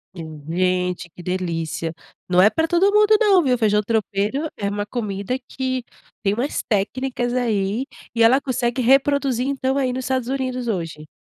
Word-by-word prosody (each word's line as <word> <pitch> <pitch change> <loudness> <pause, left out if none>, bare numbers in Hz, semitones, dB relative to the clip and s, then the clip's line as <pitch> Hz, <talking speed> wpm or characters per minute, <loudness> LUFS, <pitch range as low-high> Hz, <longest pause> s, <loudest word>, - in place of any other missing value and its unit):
Hum, 160 -3 -8
gente 180 0 0
que 175 - -13
delícia, 165 -3 -3 0.4
não 180 0 +5
é 210 - +7
para 320 +8 0
todo 360 +4 +3
mundo 425 0 +6
não, 395 -5 +5
viu, 255 -3 +2
feijão 210 -2 +3
tropeiro 220 +6 0
é 200 -1 -2
uma 205 0 -2
comida 205 0 -3
que 260 -1 -2 0.4
tem 200 -1 +2
umas 245 +7 -1
técnicas 245 +4 -1
aí, 225 -1 0 0.3
e 230 - +4
ela 245 +4 +6
consegue 255 -2 -1
reproduzir 270 0 +3
então 270 -1 0
aí 260 -2 +1
nos 255 0 -4
Estados 260 -2 -1
Unidos 255 -2 -2
hoje. 165 -7 -4
235 Hz, 165 wpm, -22 LUFS, 195-265 Hz, 0.4 s, é